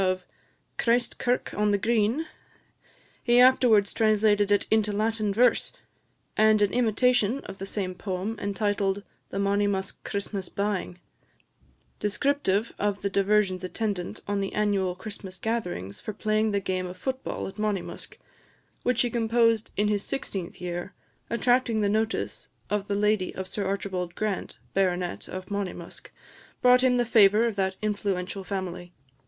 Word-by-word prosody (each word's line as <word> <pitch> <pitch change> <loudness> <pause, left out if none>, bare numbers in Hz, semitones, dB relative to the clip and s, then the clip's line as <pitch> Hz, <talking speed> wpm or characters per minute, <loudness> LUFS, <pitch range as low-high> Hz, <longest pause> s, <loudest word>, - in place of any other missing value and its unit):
of 185 -1 0 0.5
"Christ 240 +1 +1
kirk 245 0 0
on 210 0 +1
the 205 - +3
Green;" 225 +7 +1 1.0
he 240 0 +4
afterwards 245 -5 +5
translated 210 -2 +3
it 205 - +3
into 215 -1 +3
Latin 215 0 0
verse; 245 +5 +3 0.6
and 215 -1 +5
an 200 - +1
imitation 245 0 +3
of 195 - -10
the 195 - -5
same 190 -3 -2
poem, 190 +3 -3
entitled 200 -1 0 0.3
"The - - -5
Monymusk 200 -1 0
Christmas 200 -2 -4
Ba'ing," 200 -3 -2 1.0
descriptive 215 -1 +1
of 205 -1 -1
the 200 - 0
diversions 195 -2 +2
attendant 190 -1 -3
on 205 0 0
the 195 - -3
annual 200 -4 +1
Christmas 190 -1 -8
gatherings 180 - -3
for 215 - -5
playing 215 +1 +1
the 200 -1 +1
game 185 -1 -2
of 180 +1 -8
foot 260 +7 -3
ball - - -4
at 195 - -10
Monymusk, 210 -3 -3 0.6
which 250 -1 +2
he 245 - +1
composed 230 -1 +2
in 205 +1 +2
his 205 -1 +1
sixteenth 195 -10 -4
year, 175 +2 -5 0.3
attracting 245 -1 +2
the 205 - +2
notice 220 +2 -1 0.2
of 205 -1 0
the 200 - -1
lady 210 -2 +1
of 190 0 -4
Sir 200 +1 -3
Archibald 190 -3 -3
Grant, 215 -3 -3 0.2
Bart. 180 -2 0
of 185 +1 -7
Monymusk, 190 -4 -5 0.5
brought 250 0 +5
him 250 -1 +4
the 245 - +2
favour 215 -1 +5
of 230 -3 -1
that 190 -1 0
influential 200 -2 -2
family. 180 -2 -5
205 Hz, 150 wpm, -27 LUFS, 190-220 Hz, 1.0 s, afterwards